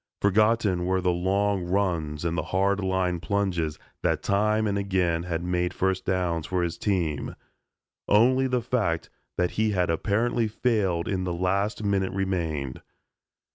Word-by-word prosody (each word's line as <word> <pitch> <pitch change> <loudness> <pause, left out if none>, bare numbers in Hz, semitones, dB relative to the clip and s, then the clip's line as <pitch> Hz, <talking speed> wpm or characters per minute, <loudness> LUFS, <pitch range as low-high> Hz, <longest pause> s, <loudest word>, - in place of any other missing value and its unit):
Forgotten 100 -3 +2
were 95 0 +2
the 90 -1 +1
long 95 +2 +1
runs 85 -5 -1
and 85 0 0
the - - 0
hard 100 +2 +1
line 95 -2 0
plunges 90 -5 -1 0.2
that - - 0
time 105 +2 +2
and 100 -1 0
again 95 -4 0
had 85 -1 -3
made 90 0 -1
first 95 0 0
downs 90 -4 -1
for 90 -1 0
his 85 -1 -2
team. 85 -8 -1 0.7
Only 130 +5 +4
the 125 -2 0
fact 105 -10 -1 0.3
that 90 -1 +1
he 110 -1 0
had 90 -3 +1
apparently 110 +7 +1
failed 105 -7 0
in 95 -2 -1
the 90 -1 -2
last 100 +4 0
minute 100 -2 0
remained. 85 -9 -2
95 Hz, 150 wpm, -26 LUFS, 90-100 Hz, 0.7 s, Only